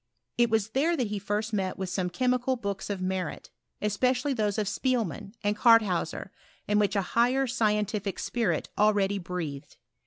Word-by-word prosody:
It 240 -1 +5
was 220 -1 +1
there 320 +7 +2
that 245 -6 0
he 210 -1 -2
first 210 +2 -2
met 190 -2 -1
with 190 -1 -3
some 180 0 -1
chemical 250 +6 +1
books 200 -5 -4
of 195 -2 -3
merit, 185 -3 -3 0.3
es 210 -1 0
pecially 255 +3 +1
those 210 -3 0
of 215 - +1
Spiebnan, 220 -3 -1
and 205 0 +1
Cartheuaer, 210 -6 +3 0.4
in 210 0 +3
which 205 0 +1
a 200 - +2
higher 250 +3 +3
scientific 210 -5 0
spirit 205 -10 -1
already 205 -1 +3
breathed. 170 -6 -6
210 Hz, 165 wpm, -28 LUFS, 195-235 Hz, 0.4 s, It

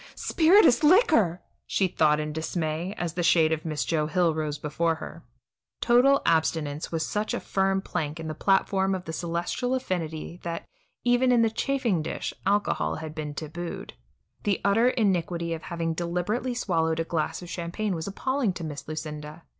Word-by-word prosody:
"Spirituous 330 - +5
liquor!" 295 - +4 0.2
she 190 - +1
thought 155 -3 +2
in 150 0 -3
dismay, 160 +3 -3
as 170 -2 -3
the 175 - -2
shade 165 -2 +4
of 160 -1 -1
Miss 155 -2 -2
Joe 155 -2 0
Hill 170 +1 +2
rose 155 -1 -2
before 165 +3 0
her. 160 +1 -9 0.6
Total 260 +4 +4
abstinence 160 -2 0
was 160 -1 -1
such 210 +1 -2
a - - -2
firm 195 0 0
plank 155 -4 -3
in 160 - -5
the 155 - -3
platform 195 +2 +2
of 180 - -6
the 160 - -5
celestial 175 +10 -2
affinity 170 -7 -4
that, 170 -1 -5 0.4
even 245 +1 +3
in 240 -2 +5
the 225 - +2
chafing 240 - 0
dish, - - -4
alcohol 205 +1 +1
had 155 -1 -6
been 150 -2 -5
tabooed. 165 +3 -6 0.5
The 200 -2 0
utter 225 +5 +4
iniquity 175 -7 0
of 160 - -5
having 165 -1 -3
deliberately 180 +9 -2
swallowed 165 -8 0
a - - +1
glass 165 +1 -2
of 175 - -9
champagne 185 +4 -3
was 165 0 -4
appalling 250 +1 -1
to 175 - -7
Miss 150 -3 -6
Lucinda. 155 0 -6
170 Hz, 170 wpm, -26 LUFS, 160-205 Hz, 0.6 s, Spirituous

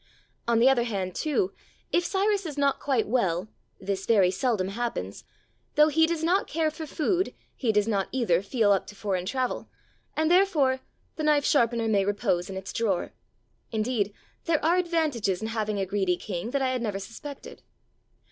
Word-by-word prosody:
On 235 -1 +3
the 235 +3 +5
other 265 -2 +5
hand, 195 -5 -3
too, 320 - 0 0.4
if 350 - +3
Cyrus 395 +1 +1
is 295 -2 -7
not 280 -1 +2
quite 265 -5 0
well 195 -5 0 0.3
(this 195 -1 -3
very 195 -6 +5
seldom 195 -2 0
happens), 200 - -4 0.5
though 300 +1 +6
he 320 +2 +4
does 330 -1 -2
not 360 +4 +2
care 315 0 0
for 315 +1 -7
food, 355 +6 0 0.2
he 240 -4 +1
does 210 0 +2
not, 200 -3 0
either, 220 -10 +2
feel 210 0 +2
up 195 - +2
to 205 - -10
foreign 190 -3 -2
travel, 255 +3 -2 0.5
and, 315 +1 +2
therefore, 315 -9 +3 0.4
the 310 - -3
knife 300 -2 +3
sharpener 235 -4 +2
may 205 -3 +3
repose 195 -3 0
in 190 - -5
its 190 - -6
drawer. 200 -6 -1 0.6
Indeed, 215 -2 0 0.3
there 320 -3 +1
are 340 +3 +4
advantages 310 - 0
in 220 - -4
having 215 -2 -1
a 195 - 0
greedy 190 -2 0
king 185 +3 -4
that 275 +1 0
I 260 - +2
had 255 -1 -1
never 210 -4 -2
suspected. 255 +8 -9
235 Hz, 180 wpm, -27 LUFS, 200-300 Hz, 0.6 s, though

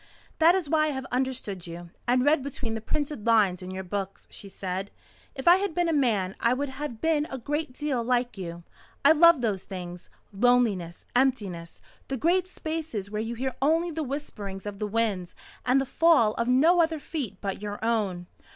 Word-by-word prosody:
"That 330 +3 +6
is 370 -5 -1
why 310 +1 +3
I 300 -2 -1
have 265 - -5
understood 250 -8 -2
you, 170 0 -9 0.2
and 250 +1 +3
read 295 0 +4
between 255 -4 -4
the 225 - -4
printed 285 -2 -3
lines 205 -5 +4
in 185 - -7
your 190 0 -5
books," 195 +1 -5
she 200 - -11
said. 190 +1 -4 0.5
"If 265 +2 -6
I 350 +1 +9
had 390 -4 -2
been 350 -1 +2
a 330 - +1
man, 215 -10 +1
I 235 +1 +2
would 280 +1 -2
have 265 -4 -6
been 315 -2 +2
a 265 - -4
great 295 +3 -3
deal 275 -3 -1
like 245 0 0
you. 170 -3 -7 0.4
I 285 - +9
love 330 -2 +6
those 205 -5 -1
things 180 -2 -8 0.2
loneliness, 205 -6 +2
emptiness, 205 -10 0 0.2
the 270 - -3
great 350 +6 +2
spaces 315 - -5
where 210 0 -2
you 230 +2 -4
hear 260 +2 -2
only 325 +4 +2
the 320 0 -3
whisperings 225 -9 -5
of 205 -1 -6
the 210 - -1
winds 205 -5 -1 0.3
and 255 +2 +5
the 270 - 0
fall 275 -7 +4
of 235 +1 -2
no 315 +8 +5
other 325 -1 +1
feet 270 - -5
but 195 -1 -4
your 205 0 -4
own. 200 -6 0
245 Hz, 195 wpm, -27 LUFS, 200-295 Hz, 0.5 s, I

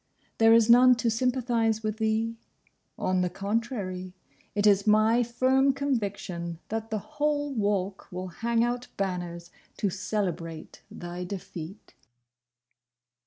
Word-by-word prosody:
There 225 0 +6
is 230 -1 +6
none 250 +1 +7
to 235 -1 0
sympathise 230 -2 +1
with 215 0 -2
thee. 220 +1 0 0.6
On 185 0 +1
the 180 - +1
contrary, 195 -2 -3 0.4
it 205 0 +1
is 200 0 +4
my 215 +3 +5
firm 260 +3 +2
conviction 200 -11 -3
that 225 0 -3
the 220 - -1
whole 290 +5 -1
Walk 200 -4 -1
will 185 +1 -5
hang 230 +5 0
out 240 +1 -2
banners 175 -3 -3 0.3
to 200 - 0
celebrate 175 -5 -4
thy 175 +1 -6
defeat. 180 0 -8
215 Hz, 120 wpm, -27 LUFS, 185-235 Hz, 0.6 s, none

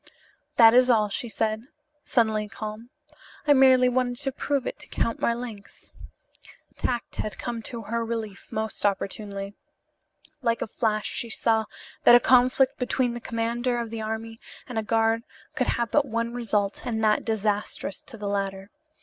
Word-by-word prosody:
"That 225 -1 +8
is 250 +1 +6
all," 215 -3 +4
she 235 +4 -3
said, 220 +2 -1 0.4
suddenly 220 -3 +1
calm. 215 +2 -7 0.6
"I 295 - +6
merely 260 -2 +6
wanted 250 -1 0
to 270 - 0
prove 275 0 -1
it - - -4
to - - -9
Count 230 - -1
Marlanx." 235 -4 -4 0.8
Tact 240 -2 -3
had 215 - -3
come 235 -1 -4
to 230 0 -6
her 230 +2 -2
relief 225 -3 -5
most 220 -1 -3
opportunely. 200 0 -2 0.9
Like 230 -2 +1
a - - -5
flash 215 -2 -1
she 235 - -3
saw 220 0 +1 0.4
that 240 - +9
a - - +8
conflict 255 +2 +4
between 250 -1 0
the 240 - -6
commander 235 +2 -1
of 230 -2 -4
the 225 -1 -4
army 220 +1 -5 0.3
and 245 -3 -2
a - - -2
guard 225 +1 +2 0.3
could - - 0
have 235 -2 0
but 290 +2 +3
one 230 0 -2
result 210 -4 -1
and 225 -3 -2
that 215 -1 +3
disastrous 210 -3 -2
to 235 - -12
the 205 -1 -5
latter. 195 0 -3
225 Hz, 165 wpm, -26 LUFS, 215-240 Hz, 0.9 s, that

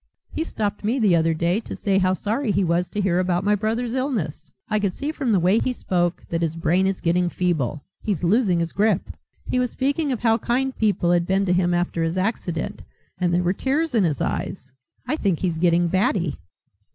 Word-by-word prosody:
He 320 - -2
stopped 210 -10 -3
me 225 +5 +1
the 210 -8 +4
other 165 0 +2
day 170 +5 +1
to - - -7
say 195 -2 +1
how 185 0 +2
sorry 225 +7 -2
he 195 +1 +2
was 175 0 +1
to 205 - -2
hear 180 -2 +1
about 180 0 0
my 205 +1 +3
brother's 225 +3 -1
illness. 255 - -2 0.2
I 215 -1 +1
could 200 -3 -1
see 290 +2 -3
from 275 -6 -2
the 200 - +4
way 185 +6 +3
he 255 - 0
spoke 175 -7 -1
that 165 0 -1
his 165 -1 -1
brain 175 +3 +2
is 195 -1 -2
getting 175 +1 +2
feeble. 155 -6 -1 0.2
He's 195 -6 -2
losing 190 -1 +3
his 165 -1 -2
grip. 205 -2 +1 0.3
He 250 - 0
was 250 -1 +1
speaking 280 +4 0
of 245 - -2
how 225 -1 +3
kind 260 +4 0
people 205 -5 +1
had 175 -1 +2
been 195 +1 +2
to 180 - +2
him 180 -1 +2
after 175 -1 -1
his 165 +2 -1
accident 185 -2 -2 0.4
and 180 -2 +1
there 175 +1 +2
were 180 +1 +1
tears 290 +8 -1
in 220 -4 +3
his 155 -6 0
eyes. 130 0 -3 0.3
I - - 0
think 195 - +1
he's 170 -2 -2
getting 175 0 +3
batty." 180 - 0
190 Hz, 220 wpm, -23 LUFS, 175-220 Hz, 0.4 s, the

